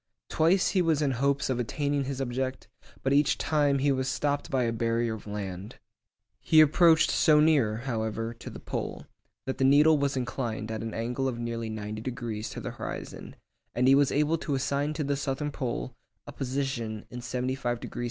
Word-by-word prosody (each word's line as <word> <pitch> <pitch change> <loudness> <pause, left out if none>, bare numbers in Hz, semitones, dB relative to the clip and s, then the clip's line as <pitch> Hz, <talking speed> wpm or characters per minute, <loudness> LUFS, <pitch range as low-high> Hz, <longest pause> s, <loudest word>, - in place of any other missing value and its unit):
Twice 175 +4 +3
he 190 - +2
was 160 -3 +2
in 140 - +1
hopes 140 +2 +1
of 130 -2 -1
attaining 140 +3 -1
his 135 0 -4
object, 130 0 -3 0.4
but 135 - +2
each 145 +1 +3
time 145 -3 +2
he 140 +1 +2
was 130 -1 0
stopped 145 +1 -1
by 130 -2 +1
a 115 - 0
barrier 115 0 0
of 110 -1 -9
land. 100 -1 -6 0.6
He 155 +5 +4
approached 160 +1 +5
so 150 -1 +5
near, 140 -9 +3
however, 115 -2 -2
to 115 - -10
the - - -9
pole, - - -5 0.4
that 130 - -4
the - - +2
needle 145 +3 +6
was 140 -1 0
inclined 120 -3 -3
at 110 - -4
an 115 -1 -5
angle 125 +4 -1
of 125 -3 -2
nearly 115 -1 -3
ninety 110 0 -5
degrees 115 -3 -4
to - - -7
the - - -5
horizon, - - -7 0.4
and 125 +1 +2
he 135 - +7
was 140 0 +4
able 150 +3 +1
to 145 - -2
assign 140 +2 -1
to 155 - -2
the 140 0 0
southern 140 +1 -2
pole - - -4 0.3
a - - -8
position 130 -5 -3
in 125 - -6
75° 125 -1 -2
S. - - -10
130 Hz, 190 wpm, -28 LUFS, 115-145 Hz, 0.6 s, he